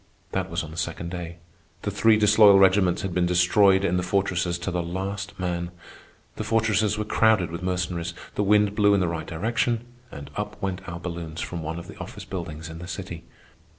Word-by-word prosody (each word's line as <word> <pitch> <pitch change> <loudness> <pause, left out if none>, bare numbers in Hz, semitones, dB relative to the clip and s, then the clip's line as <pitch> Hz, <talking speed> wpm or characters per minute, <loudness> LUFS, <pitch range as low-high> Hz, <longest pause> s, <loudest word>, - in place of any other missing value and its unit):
That - - -2
was - - -2
on 75 - -8
the 80 - -10
second 85 0 -3
day. 85 -1 -6 0.5
The 105 - -1
three 110 +2 +4
disloyal 105 -1 +7
regiments 95 -2 +4
had 95 -2 -3
been 90 0 +2
destroyed 95 +2 +4
in 90 -1 +1
the - - +1
fortresses 90 -2 0
to 85 +3 -4
the 90 0 -1
last 95 +4 -4
man. 85 -1 -2 0.7
The - - -2
fortresses 110 -1 +1
were 105 - -2
crowded 105 -6 +3
with 85 - -5
Mercenaries, 90 -2 -2 0.2
the - - -1
wind 105 0 +3
blew 100 -1 +4
in - - +2
the 90 - +1
right 85 -2 -4
direction, 115 +6 -1 0.3
and 70 - -9
up - - -4
went 95 -1 -3
our 85 0 -6
balloons 85 -2 -6
from 85 -2 -4
one 80 +1 -4
of 85 - -8
the - - -12
office - - -8
buildings 80 -4 -6
in 80 0 -8
the 90 - -8
city. 90 -3 -7
90 Hz, 205 wpm, -25 LUFS, 85-100 Hz, 0.7 s, disloyal